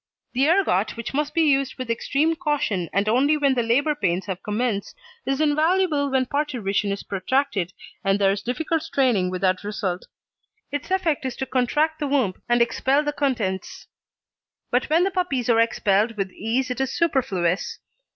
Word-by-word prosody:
The 270 Hz, +4 st, +2 dB
ergot, 280 Hz, -, +2 dB
which 230 Hz, +2 st, -5 dB
must 295 Hz, +1 st, -1 dB
be 330 Hz, -, +4 dB
used 275 Hz, -3 st, +2 dB
with 255 Hz, -3 st, -3 dB
extreme 295 Hz, +7 st, +1 dB
caution 295 Hz, -, -1 dB
and 200 Hz, +2 st, 0 dB
only 275 Hz, +7 st, +3 dB
when 280 Hz, -2 st, +3 dB
the 250 Hz, -, +1 dB
labour 265 Hz, +7 st, +2 dB
pains 185 Hz, -10 st, -1 dB
have 190 Hz, -2 st, -5 dB
commenced, 210 Hz, -1 st, -2 dB, 0.3 s
is 270 Hz, +1 st, 0 dB
invaluable 310 Hz, 0 st, +2 dB
when 265 Hz, -1 st, +1 dB
parturition 240 Hz, -8 st, -1 dB
is 200 Hz, -, -4 dB
protracted, 195 Hz, -2 st, -1 dB, 0.3 s
and 195 Hz, 0 st, +2 dB
there 195 Hz, -1 st, +3 dB
is 200 Hz, 0 st, -2 dB
difficult 315 Hz, +8 st, -1 dB
straining 255 Hz, -, +1 dB
without 185 Hz, +1 st, 0 dB
result. 200 Hz, -3 st, -3 dB, 0.6 s
Its 290 Hz, +3 st, -4 dB
effect 360 Hz, -7 st, 0 dB
is 260 Hz, -2 st, -3 dB
to 265 Hz, -, -3 dB
contract 295 Hz, +5 st, 0 dB
the 295 Hz, -, -1 dB
womb 265 Hz, -9 st, +1 dB, 0.2 s
and 240 Hz, 0 st, +5 dB
expel 270 Hz, +4 st, +1 dB
the 295 Hz, 0 st, -2 dB
contents. 230 Hz, -10 st, -2 dB, 0.9 s
But 245 Hz, +3 st, +1 dB
when 325 Hz, +3 st, +4 dB
the 390 Hz, -, +1 dB
puppies 280 Hz, -, 0 dB
are 225 Hz, -, +4 dB
expelled 220 Hz, -1 st, +2 dB
with 195 Hz, -2 st, -2 dB
ease 245 Hz, +6 st, -2 dB
it 250 Hz, -, -2 dB
is 265 Hz, 0 st, -1 dB
superfluous. 195 Hz, -, 0 dB
255 Hz, 170 wpm, -23 LUFS, 205-295 Hz, 0.9 s, and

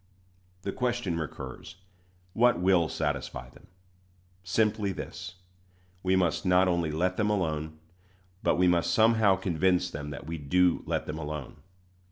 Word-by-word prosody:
The 100 Hz, -, -2 dB
question 120 Hz, -9 st, -1 dB
recurs, 80 Hz, +2 st, -7 dB, 0.6 s
What 120 Hz, -2 st, +4 dB
will 90 Hz, -3 st, +3 dB
satisfy 65 Hz, -5 st, -3 dB
them? -, -, -19 dB, 0.8 s
Simply 105 Hz, +2 st, +1 dB
this: 90 Hz, 0 st, -7 dB, 0.7 s
we 95 Hz, 0 st, +2 dB
must 90 Hz, -4 st, +1 dB
not 90 Hz, 0 st, +4 dB
only 85 Hz, -3 st, +1 dB
let 90 Hz, +4 st, 0 dB
them 105 Hz, -1 st, +1 dB
alone, 80 Hz, -6 st, -1 dB, 0.6 s
but -, -, +2 dB
we 90 Hz, 0 st, +3 dB
must 85 Hz, -1 st, +2 dB
somehow 110 Hz, -3 st, +5 dB
convince 90 Hz, 0 st, +1 dB
them 75 Hz, -1 st, -6 dB
that 75 Hz, -, -7 dB
we 80 Hz, 0 st, -5 dB
do 90 Hz, +5 st, +2 dB
let -, -, -1 dB
them 75 Hz, +1 st, -5 dB
alone. 75 Hz, -3 st, -6 dB
90 Hz, 140 wpm, -28 LUFS, 80-95 Hz, 0.8 s, somehow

